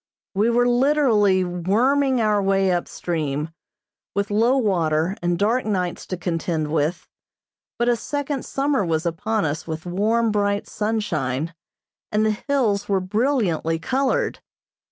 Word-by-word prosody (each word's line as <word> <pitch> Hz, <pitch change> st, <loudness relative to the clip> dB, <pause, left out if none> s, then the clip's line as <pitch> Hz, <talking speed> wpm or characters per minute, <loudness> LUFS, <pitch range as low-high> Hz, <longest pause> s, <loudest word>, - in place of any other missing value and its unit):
We 210 Hz, +4 st, +2 dB
were 245 Hz, +1 st, +3 dB
literally 240 Hz, -7 st, +3 dB
worming 240 Hz, +10 st, +1 dB
our 210 Hz, -2 st, +2 dB
way 195 Hz, -1 st, +2 dB
up 175 Hz, -1 st, 0 dB
stream, 155 Hz, -2 st, -3 dB, 0.6 s
with 200 Hz, 0 st, -1 dB
low 230 Hz, +6 st, +3 dB
water 170 Hz, -6 st, +1 dB
and 175 Hz, 0 st, 0 dB
dark 225 Hz, +7 st, +1 dB
nights 185 Hz, -5 st, -2 dB
to 185 Hz, -, -3 dB
contend 165 Hz, -3 st, -2 dB
with, 160 Hz, +3 st, -1 dB, 0.7 s
but 240 Hz, -, 0 dB
a 240 Hz, -, +4 dB
second 285 Hz, +3 st, -3 dB
summer 275 Hz, -4 st, 0 dB
was 165 Hz, -1 st, -1 dB
upon 200 Hz, +5 st, -1 dB
us 150 Hz, +2 st, -3 dB
with 160 Hz, 0 st, -5 dB
warm, 215 Hz, +6 st, +1 dB
bright 205 Hz, -1 st, 0 dB
sunshine, 165 Hz, -, -2 dB, 0.6 s
and 215 Hz, +1 st, +2 dB
the 215 Hz, -, +3 dB
hills 215 Hz, -3 st, 0 dB
were 195 Hz, -1 st, +2 dB
brilliantly 190 Hz, -, 0 dB
colored. 265 Hz, +9 st, 0 dB
200 Hz, 135 wpm, -22 LUFS, 170-235 Hz, 0.7 s, a